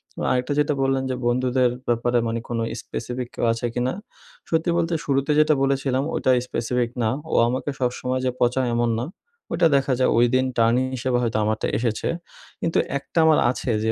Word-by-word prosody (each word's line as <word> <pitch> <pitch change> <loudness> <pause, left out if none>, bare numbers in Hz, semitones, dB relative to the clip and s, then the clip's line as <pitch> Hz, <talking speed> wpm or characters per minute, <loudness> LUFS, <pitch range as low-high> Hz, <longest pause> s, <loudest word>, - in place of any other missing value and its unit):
এবং - - -3
আরেকটা 125 +3 0
যেটা 150 0 +2
বললেন 135 0 +1
যে, 130 - -1
বন্ধুদের 125 +1 +2 0.2
ব্যাপারে 120 +1 +1
মানে 115 +1 -1
কোনো 115 -1 -1
স্পেসিফিক 125 +1 -5
আ - - -54
কেউ - - -1
আছে 115 +2 -4
কিনা? 125 +1 -1 0.6
সত্যি 160 +1 +1
বলতে 170 0 0
শুরুতে 140 +1 +1
যেটা 155 0 +5
বলেছিলাম 135 -1 +1
ওইটা 130 - +2
স্পেসিফিক 120 0 -1
না। 110 - +2 0.2
ও - - +2
আমাকে 130 +4 -2
সবসময় 125 +1 -1
যে 125 - +1
পচায় 125 +1 +2
এমন 120 0 +1
না। 125 - -3 0.4
ওইটা 170 0 +4
দেখা 135 -1 0
যায় 130 - +3
ওইদিন 125 +2 +3
টার্নিং 115 +3 +3
হিসেবে 125 0 0
হয়তো 115 -2 0
আমারটা 110 +1 0
এসেছে। 115 -1 -1 0.5
কিন্তু 165 - 0 0.2
একটা 155 - -3
আমার 160 -1 +5
আছে 130 - -3
যে 110 - +2
125 Hz, 185 wpm, -23 LUFS, 120-135 Hz, 0.6 s, যেটা